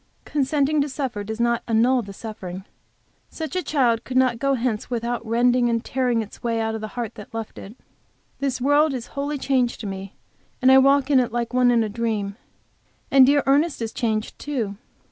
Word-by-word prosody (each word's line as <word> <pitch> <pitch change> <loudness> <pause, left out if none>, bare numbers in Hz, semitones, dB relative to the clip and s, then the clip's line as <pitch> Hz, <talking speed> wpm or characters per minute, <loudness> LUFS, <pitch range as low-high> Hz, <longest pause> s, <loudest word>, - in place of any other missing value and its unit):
Consenting 290 +1 +1
to 290 - -1
suffer 260 -7 -3
does 220 +2 -6
not 235 0 +1
annul 240 +3 +3
the 200 -3 -9
suffering. 195 -3 -8 0.6
Such 320 +2 -6
a 365 - +1
child 245 -8 +1
could 255 - -3
not 255 -3 +3
go 275 +1 +2
hence 235 -3 -2
without 240 -1 -2
rending 240 +2 +2
and 230 0 -1
tearing 245 -3 0
its 210 - -13
way 230 -2 -1
out 220 0 -1
of 220 - -4
the 215 - -4
heart 235 -3 -3
that 210 +1 -11
loved 225 -1 -6
it. 205 +4 -10 0.6
This 275 -2 -1
world 290 +2 +3
is 245 -2 -5
wholly 285 +1 -2
changed 260 -3 0
to - - -6
me 195 0 -6 0.4
and 260 0 +5
I 265 - +8
walk 275 +1 +3
in 270 - +6
it 245 -2 0
like 240 +1 -2
one 250 -1 +4
in 235 -2 +3
a - - -1
dream. 210 -2 -2 0.8
And 270 -1 +7
dear 285 0 +4
Ernest 290 +3 +2
is 225 -1 -4
changed, 220 -4 -2
too. 235 -9 -3
240 Hz, 205 wpm, -23 LUFS, 225-270 Hz, 0.8 s, I